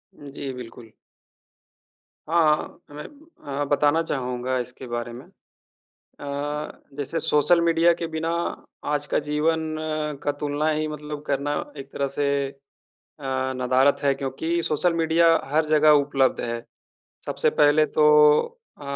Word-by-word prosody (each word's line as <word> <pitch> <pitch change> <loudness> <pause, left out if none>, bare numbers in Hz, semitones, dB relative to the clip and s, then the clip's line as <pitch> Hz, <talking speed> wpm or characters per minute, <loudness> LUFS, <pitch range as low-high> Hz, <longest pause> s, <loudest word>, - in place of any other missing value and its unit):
जी, 140 -1 -7
बिल्कुल। 115 -2 -10 1.4
हाँ, 170 0 +4
हाँ। 145 -4 -11
मैं 150 - -7 0.6
अ, - - +2
बताना 145 +3 +2
चाहूँगा 125 -3 -2
इसके 125 +1 -7
बारे 120 0 -4
में। 120 - -10 0.7
अ, 145 +1 -6
जैसे 145 +3 -3
सोशल 160 +2 +3
मीडिया 170 0 +4
के 170 0 -4
बिना 160 0 -3 0.6
आज 145 0 -1
का - - +3
जीवन 155 +2 +1 0.6
का 145 - 0
तुलना 150 +1 -1
ही 155 0 -1
मतलब 150 -1 -6
करना 140 +1 -1 0.3
एक 135 0 -9
तरह 140 - -1
से 145 - +1 0.2
अ, - - -11 1.0
नदारत 130 +2 +3
है 140 - +3
क्योंकि 145 +6 -2
सोशल 165 +3 +1
मीडिया 165 0 +3 0.2
हर 155 +1 +2
जगह 155 0 +4
उपलब्ध 135 -2 +1
है। 115 0 -4 0.6
सबसे - - +1
पहले 150 +1 +5
तो 150 +1 +1 0.7
अ, - - -14
145 Hz, 135 wpm, -24 LUFS, 135-155 Hz, 1.4 s, पहले